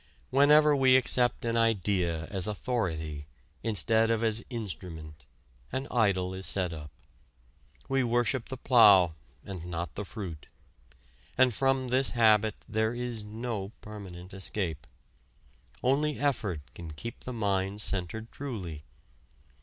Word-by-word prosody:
Whenever 150 Hz, +2 st, +6 dB
we 130 Hz, -1 st, +6 dB
accept 125 Hz, -1 st, +2 dB
an 115 Hz, 0 st, 0 dB
idea 95 Hz, -7 st, +1 dB
as 95 Hz, -2 st, +1 dB
authority 80 Hz, -, -3 dB, 0.3 s
instead 110 Hz, +1 st, +2 dB
of 115 Hz, 0 st, +1 dB
as 110 Hz, 0 st, +2 dB
instrument, 80 Hz, -, -7 dB, 0.5 s
an 135 Hz, +1 st, -3 dB
idol 95 Hz, -6 st, +1 dB
is 95 Hz, 0 st, -4 dB
set 90 Hz, -3 st, -1 dB
up. 75 Hz, -2 st, -8 dB, 1.0 s
We 135 Hz, -1 st, +1 dB
worship 120 Hz, +1 st, 0 dB
the 130 Hz, -, -4 dB
plough, 100 Hz, -10 st, +6 dB, 0.3 s
and 95 Hz, -4 st, -7 dB
not 85 Hz, 0 st, -4 dB
the 100 Hz, -, -5 dB
fruit. 95 Hz, -7 st, -8 dB, 0.9 s
And 130 Hz, -2 st, +4 dB
from 135 Hz, +2 st, +1 dB
this 130 Hz, +1 st, +1 dB
habit 110 Hz, -2 st, +4 dB
there 110 Hz, +1 st, 0 dB
is 120 Hz, -3 st, -3 dB
no 110 Hz, -1 st, -5 dB
permanent 95 Hz, -3 st, -10 dB
escape. 90 Hz, -6 st, 0 dB, 1.0 s
Only 145 Hz, +3 st, +1 dB
effort 110 Hz, -, -1 dB
can 80 Hz, -2 st, -9 dB
keep 115 Hz, +10 st, -7 dB
the 125 Hz, -, -7 dB
mind 100 Hz, -2 st, -1 dB
centered 105 Hz, +3 st, -3 dB
truly. 95 Hz, -, -6 dB
110 Hz, 125 wpm, -29 LUFS, 90-120 Hz, 1.0 s, Whenever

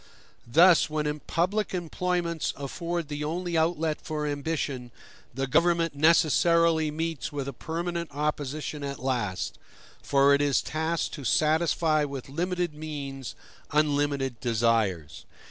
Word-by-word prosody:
Thus, 165 Hz, +7 st, +6 dB
when 150 Hz, 0 st, -2 dB
public 190 Hz, +4 st, 0 dB
employments 175 Hz, -1 st, -1 dB
afford 170 Hz, +4 st, -3 dB
the 150 Hz, 0 st, -4 dB
only 170 Hz, +3 st, -2 dB
outlet 160 Hz, -1 st, +1 dB
for 155 Hz, -2 st, -3 dB
ambition, 145 Hz, -3 st, -3 dB, 0.4 s
the 135 Hz, +2 st, -2 dB
government 165 Hz, +3 st, +2 dB
necessarily 165 Hz, +1 st, +4 dB
meets 160 Hz, -1 st, -3 dB
with 140 Hz, -2 st, -4 dB
a 140 Hz, -, -4 dB
permanent 170 Hz, +1 st, -4 dB
opposition 150 Hz, 0 st, -3 dB
at 140 Hz, -1 st, -4 dB
last; 120 Hz, -8 st, -2 dB, 0.4 s
for 140 Hz, 0 st, +4 dB
it 140 Hz, -, +3 dB
is 145 Hz, -2 st, +2 dB
tasked 160 Hz, +2 st, -2 dB
to 145 Hz, -, -7 dB
satisfy 155 Hz, +1 st, +2 dB
with 140 Hz, -2 st, -5 dB
limited 175 Hz, +2 st, -1 dB
means 140 Hz, -4 st, -6 dB, 0.3 s
unlimited 145 Hz, -4 st, +1 dB
desires. 110 Hz, -, 0 dB
150 Hz, 120 wpm, -27 LUFS, 140-165 Hz, 0.4 s, Thus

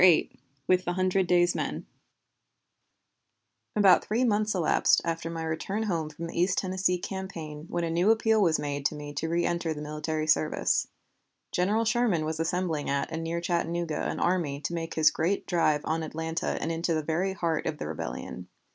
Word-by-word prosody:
VIII 180 Hz, -3 st, +6 dB, 0.3 s
WITH 185 Hz, +3 st, +2 dB
THE 175 Hz, -, 0 dB
HUNDRED 185 Hz, 0 st, +1 dB
DAYS 175 Hz, 0 st, +4 dB
MEN -, -, -3 dB, 1.9 s
About 195 Hz, -4 st, +6 dB
three 225 Hz, +4 st, 0 dB
months 215 Hz, -3 st, +1 dB
elapsed 175 Hz, -4 st, +3 dB
after 165 Hz, 0 st, -2 dB
my 165 Hz, -1 st, -4 dB
return 175 Hz, +7 st, -2 dB
home 165 Hz, -7 st, -1 dB
from 160 Hz, +2 st, -7 dB
the 170 Hz, 0 st, -2 dB
East 185 Hz, +2 st, +2 dB
Tennessee 185 Hz, -1 st, +1 dB
campaign 170 Hz, -5 st, -6 dB
when 175 Hz, -, -1 dB
a 165 Hz, -, -1 dB
new 175 Hz, +5 st, +2 dB
appeal 220 Hz, -1 st, +4 dB
was 165 Hz, -5 st, +4 dB
made 145 Hz, -1 st, -3 dB
to -, -, -7 dB
me 145 Hz, 0 st, -7 dB
to 160 Hz, +3 st, -2 dB
reënter 170 Hz, -1 st, 0 dB
the 150 Hz, -, -6 dB
military 155 Hz, +1 st, -3 dB
service. 155 Hz, 0 st, +2 dB, 0.6 s
General 210 Hz, +6 st, +1 dB
Sherman 215 Hz, -8 st, +2 dB
was 160 Hz, 0 st, -3 dB
assembling 165 Hz, -2 st, -1 dB
at 140 Hz, +2 st, -1 dB
and 165 Hz, 0 st, -3 dB
near 165 Hz, +1 st, -2 dB
Chattanooga 170 Hz, -2 st, -1 dB
an -, -, -3 dB
army 165 Hz, -6 st, 0 dB
to 160 Hz, -, -3 dB
make 165 Hz, -1 st, -4 dB
his 155 Hz, -1 st, +5 dB
great 180 Hz, +5 st, 0 dB
drive 155 Hz, -4 st, +2 dB
on 160 Hz, +1 st, 0 dB
Atlanta 160 Hz, +1 st, -3 dB
and 165 Hz, -, -2 dB
into 165 Hz, 0 st, 0 dB
the 155 Hz, -, -1 dB
very 175 Hz, +5 st, 0 dB
heart 165 Hz, -4 st, -1 dB
of 155 Hz, -1 st, -2 dB
the 130 Hz, -, -5 dB
rebellion. 65 Hz, -5 st, -6 dB
165 Hz, 180 wpm, -28 LUFS, 155-185 Hz, 1.9 s, VIII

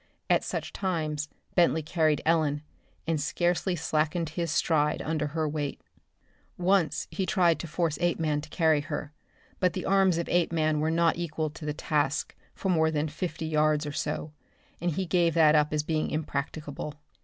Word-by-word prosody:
At -, -, +4 dB
such -, -, -4 dB
times 155 Hz, -5 st, -2 dB, 0.2 s
Bentley 170 Hz, -3 st, +3 dB
carried 155 Hz, -1 st, +1 dB
Ellen, 155 Hz, -3 st, +2 dB, 0.4 s
and 160 Hz, -2 st, 0 dB
scarcely 175 Hz, +4 st, 0 dB
slackened 160 Hz, +1 st, 0 dB
his 170 Hz, +1 st, -2 dB
stride 150 Hz, -1 st, +2 dB
under 155 Hz, -1 st, -1 dB
her 155 Hz, +1 st, -1 dB
weight. 145 Hz, -1 st, -3 dB, 0.8 s
Once 180 Hz, -4 st, +2 dB
he 190 Hz, -2 st, -2 dB
tried 170 Hz, -3 st, +3 dB
to 170 Hz, -, -5 dB
force 165 Hz, -1 st, -1 dB
Apeman 160 Hz, -4 st, +1 dB
to -, -, -11 dB
carry 160 Hz, -4 st, +3 dB
her, 150 Hz, -1 st, -5 dB, 0.5 s
but 180 Hz, -1 st, +2 dB
the 185 Hz, -, -4 dB
arms 190 Hz, -3 st, +4 dB
of 170 Hz, -, -2 dB
Apeman 160 Hz, -3 st, +2 dB
were 155 Hz, +1 st, +1 dB
not 165 Hz, 0 st, +2 dB
equal 155 Hz, -2 st, -2 dB
to 155 Hz, 0 st, -9 dB
the 150 Hz, -, -1 dB
task 145 Hz, -2 st, -1 dB, 0.2 s
for 190 Hz, -, -3 dB
more 160 Hz, -3 st, +3 dB
than 155 Hz, 0 st, -1 dB
fifty 160 Hz, 0 st, -4 dB
yards 155 Hz, -1 st, +2 dB
or 145 Hz, -, -3 dB
so, 150 Hz, +1 st, -3 dB, 0.5 s
and 175 Hz, -, +1 dB
he 190 Hz, +4 st, -1 dB
gave 170 Hz, -2 st, +2 dB
that 155 Hz, -2 st, +6 dB
up 150 Hz, -1 st, +3 dB
as 150 Hz, -1 st, 0 dB
being 155 Hz, 0 st, -1 dB
impracticable. 150 Hz, 0 st, -4 dB
160 Hz, 170 wpm, -28 LUFS, 150-170 Hz, 0.8 s, that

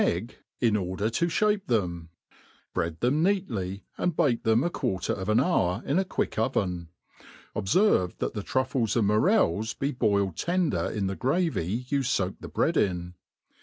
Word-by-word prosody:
99 -, -, +2 dB
egg> -, -, -13 dB, 0.2 s
in 115 Hz, -3 st, +3 dB
order 95 Hz, +2 st, -1 dB
to 170 Hz, +9 st, +1 dB
(hape 205 Hz, +2 st, +1 dB
them, 85 Hz, -7 st, -1 dB, 0.6 s
bread 85 Hz, -1 st, -2 dB
them 130 Hz, +6 st, +2 dB
neatly, 115 Hz, -, -1 dB, 0.2 s
and 180 Hz, -3 st, 0 dB
bake 120 Hz, -5 st, +2 dB
them 110 Hz, +3 st, +3 dB
a 170 Hz, -, +1 dB
quarter 95 Hz, -, -1 dB
of 95 Hz, +1 st, -4 dB
an 110 Hz, -, +4 dB
hour 100 Hz, -, +1 dB
in 145 Hz, +7 st, +2 dB
a -, -, +2 dB
quick 190 Hz, -, -2 dB
oven: 90 Hz, -10 st, -1 dB, 0.7 s
obferve 105 Hz, -, +2 dB
that -, -, -2 dB
the 105 Hz, -, -3 dB
truAes 130 Hz, 0 st, 0 dB
and 115 Hz, -3 st, +3 dB
morels 110 Hz, -, +2 dB
be 140 Hz, +1 st, -1 dB
boiled 100 Hz, -, +1 dB
tender 175 Hz, -, 0 dB
in 105 Hz, -3 st, -2 dB
the 95 Hz, 0 st, -2 dB
gravy 125 Hz, -, 0 dB
you 140 Hz, -1 st, +1 dB
foak 100 Hz, -7 st, 0 dB
the -, -, -8 dB
bread -, -, 0 dB
in. 90 Hz, -3 st, 0 dB
110 Hz, 170 wpm, -27 LUFS, 95-145 Hz, 0.7 s, an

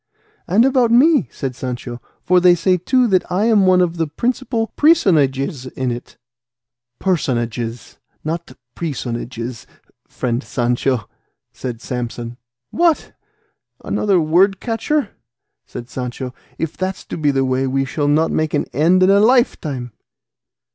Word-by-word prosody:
"And 215 Hz, +7 st, +4 dB
about 255 Hz, -3 st, +3 dB
me," 280 Hz, +6 st, +4 dB
said 135 Hz, -3 st, -5 dB
Sancho, 120 Hz, -1 st, -6 dB, 0.2 s
"for 180 Hz, 0 st, +4 dB
they 180 Hz, 0 st, +6 dB
say, 180 Hz, +2 st, +2 dB
too, 250 Hz, +9 st, +2 dB
that 190 Hz, -5 st, +1 dB
I 190 Hz, +4 st, +1 dB
am 210 Hz, -4 st, +4 dB
one 185 Hz, -1 st, +5 dB
of 175 Hz, -1 st, 0 dB
the 165 Hz, -1 st, 0 dB
principal 235 Hz, -, -2 dB
presonages 145 Hz, -, +2 dB
in 130 Hz, -1 st, -2 dB
it." 120 Hz, +1 st, -8 dB, 0.8 s
"Personages, 120 Hz, -, -2 dB, 0.2 s
not 165 Hz, +2 st, -4 dB, 0.2 s
presonages, 120 Hz, -5 st, -5 dB, 0.4 s
friend 120 Hz, +1 st, -2 dB
Sancho," 120 Hz, -1 st, -1 dB, 0.5 s
said 120 Hz, -3 st, -6 dB
Samson. 120 Hz, -1 st, -5 dB, 0.3 s
"What! 335 Hz, -2 st, +1 dB, 0.7 s
Another 200 Hz, -3 st, +1 dB
word 180 Hz, +5 st, +3 dB
catcher!" 250 Hz, +2 st, -1 dB, 0.6 s
said 120 Hz, -, -8 dB
Sancho; 125 Hz, 0 st, -5 dB, 0.2 s
"if 165 Hz, -1 st, -3 dB
that's 185 Hz, 0 st, -4 dB
to -, -, -6 dB
be 150 Hz, -3 st, +1 dB
the 135 Hz, -1 st, +1 dB
way 130 Hz, +1 st, 0 dB
we 135 Hz, +1 st, 0 dB
shall 145 Hz, +2 st, -2 dB
not 155 Hz, +3 st, +2 dB
make 155 Hz, -1 st, 0 dB
an -, -, 0 dB
end 170 Hz, +7 st, +4 dB
in 190 Hz, -, +5 dB
a 200 Hz, -, +5 dB
lifetime." 180 Hz, -, +1 dB
155 Hz, 135 wpm, -19 LUFS, 125-195 Hz, 0.8 s, they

